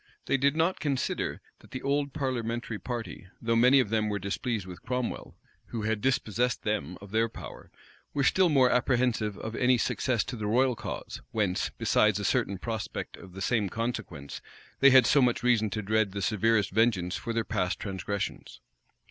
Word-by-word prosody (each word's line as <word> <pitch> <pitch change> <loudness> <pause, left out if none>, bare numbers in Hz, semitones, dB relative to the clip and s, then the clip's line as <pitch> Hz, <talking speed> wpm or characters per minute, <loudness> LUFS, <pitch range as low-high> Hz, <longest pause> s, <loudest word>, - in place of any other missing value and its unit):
They - - +2
did 140 +2 +2
not 165 +3 +1
consider, 140 -3 -2 0.2
that - - -18
the 130 - -6
old 140 0 0
parliamentary 120 -5 -3
party, 120 -6 -6
though 115 0 0
many 125 +4 +6
of 125 - +1
them 110 -1 +1
were 105 - -1
displeased 100 +2 -3
with 90 -1 -10
Cromwell, 125 -1 -3 0.3
who 115 -3 -4
had 105 -1 -1
dispossessed 125 -1 0
them 90 -5 -2
of 100 -1 -11
their 115 +1 +2
power, - - -10 0.4
were 140 - 0
still 185 +6 +4
more 135 -4 +5
apprehensive 120 -4 +1
of 110 +1 -6
any 125 +1 +3
success 120 0 0
to 125 - -6
the 105 -3 -3
royal 125 +3 +3
cause; - - -6
whence, 100 -5 0
besides 105 -1 +2
a 105 - -3
certain 100 +1 +1
prospect 110 +1 -5
of 95 -2 -13
the 95 - -8
same 105 -4 +1
consequence, 90 - -4 0.4
they 140 - +8
had 130 -2 +7
so 140 - +4
much 120 -2 +2
reason 115 -3 +3
to 110 +2 -3
dread 110 -1 +1
the 100 -1 -3
severest 110 +2 +2
vengeance 95 -4 +2
for 115 - -4
their 115 -1 -1
past 95 -4 -1
transgressions. 100 0 -4
115 Hz, 180 wpm, -28 LUFS, 105-125 Hz, 0.4 s, they